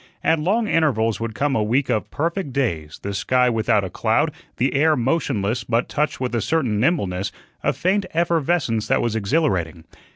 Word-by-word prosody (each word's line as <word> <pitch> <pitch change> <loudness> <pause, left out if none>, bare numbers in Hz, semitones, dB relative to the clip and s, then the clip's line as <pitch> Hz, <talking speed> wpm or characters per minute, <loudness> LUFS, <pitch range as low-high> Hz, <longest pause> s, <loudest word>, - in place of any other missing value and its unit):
At 160 - +3
long 210 +8 +1
intervals 115 - +1
would 115 -1 -4
come 145 -1 0
a 110 - +2
week 125 +6 +1
of 110 - -1
perfect 165 0 -2
days, 85 - -2
the 100 - -3
sky 125 +5 +2
without 110 -2 +2
a 95 - -4
cloud, - - +1 0.3
the 130 +3 +1
air 155 +3 +3
motionless, 120 -5 0
but 115 +1 0
touched 150 +1 -1
with 125 -2 -2
a 115 - 0
certain 125 -5 0
nimbleness, 100 - 0 0.3
a - - +2
faint 190 +2 0
effervescence 165 -8 +1
that - - +2
was 115 -2 -1
exhilarating. 100 - 0
125 Hz, 175 wpm, -22 LUFS, 110-160 Hz, 0.3 s, At